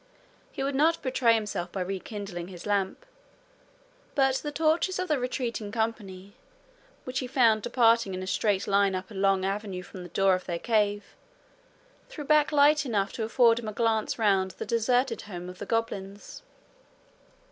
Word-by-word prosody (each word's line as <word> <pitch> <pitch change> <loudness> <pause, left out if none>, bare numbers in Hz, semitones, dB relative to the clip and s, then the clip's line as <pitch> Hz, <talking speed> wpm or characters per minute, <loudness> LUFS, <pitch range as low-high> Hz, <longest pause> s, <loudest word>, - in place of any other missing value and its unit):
He - - -4
would 280 +1 -1
not 320 +5 +2
betray 250 -3 +3
himself 210 -5 -3
by 190 - -4
rekindling 195 -1 -5
his 180 -2 -10
lamp, 200 - -1 1.1
but 270 -2 +3
the 295 - -5
torches 320 +5 +1
of 370 0 -2
the 300 -4 +1
retreating 240 -4 -3
company, 205 -4 -4 0.7
which 255 0 -3
he 255 - -4
found 230 -4 +3
departing 230 -4 +2
in 185 - -5
a - - -5
straight 200 +1 0
line 200 -1 +2
up 185 +3 -6
a - - -9
long 195 -1 +1
avenue 195 -2 -3
from 185 0 -10
the 175 - -9
door 195 +2 +3
of 185 0 -2
their 170 -2 -3
cave, 205 0 0 0.9
threw 300 - -7
back 300 +1 +3
light 300 +1 +5
enough 205 -7 -1
to 225 - -3
afford 230 +1 +4
him 230 - -7
a 215 - -4
glance 225 -1 0
round 195 -5 +1
the - - -5
deserted 245 +1 +1
home 180 -2 -7
of 180 0 -10
the 205 - -6
goblins. 205 - -4
215 Hz, 170 wpm, -27 LUFS, 195-250 Hz, 1.1 s, light